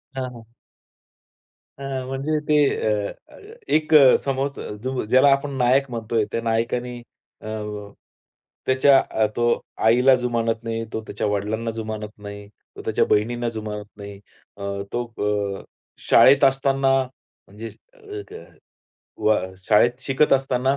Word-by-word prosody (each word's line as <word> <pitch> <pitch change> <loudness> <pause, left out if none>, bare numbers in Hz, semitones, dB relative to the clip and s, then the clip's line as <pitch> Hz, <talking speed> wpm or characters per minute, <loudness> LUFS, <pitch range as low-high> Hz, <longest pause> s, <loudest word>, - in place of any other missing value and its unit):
हां, 130 -1 -3
हां. 115 -1 -14 1.3
अ, - - -8 0.2
म्हणजे 140 +4 -2
ते 150 - +3 0.5
अ, - - -6 0.2
अ, - - -14 0.4
एक 155 0 +1
अ, 135 -4 +8
समोरचा 135 +1 -2 0.2
जो 130 -2 -2
ज्याला 130 +2 +6
आपण 140 +1 +1
नायक 130 +2 +2
म्हणतोय, 115 -2 -1
त्या 115 - -2
नायकाने 120 +2 -1 0.4
अ, 110 - -9 1.2
त्याच्या 135 +1 +5
अ, 110 - +2
तो 120 - +1 0.4
आईला 125 +4 +5
जुमानत 115 -2 -1
नाही, 115 0 -3
तो 110 - -2
त्याच्या 105 +1 -3
वडिलांना 105 +3 -2
जुमानत 110 -1 -5
नाही, 100 0 -9 0.3
तो - - -8
त्याच्या - - +1
बहिणींना 120 +3 +1
जुमानत 105 -2 -6
नाही. 100 -1 -9 0.4
अ, - - -12 0.3
तो 120 0 -1 0.5
अ, - - -13 0.5
शाळेत 140 +1 +6
असताना 135 0 +3
म्हणजे 115 -3 -13 0.3
अ, 415 -4 -9
क 440 - -9 0.8
व 110 0 +4 0.3
शाळेत 120 +4 +4
शिकत 135 +2 +2
असताना 135 0 +1
120 Hz, 135 wpm, -22 LUFS, 110-135 Hz, 1.3 s, अ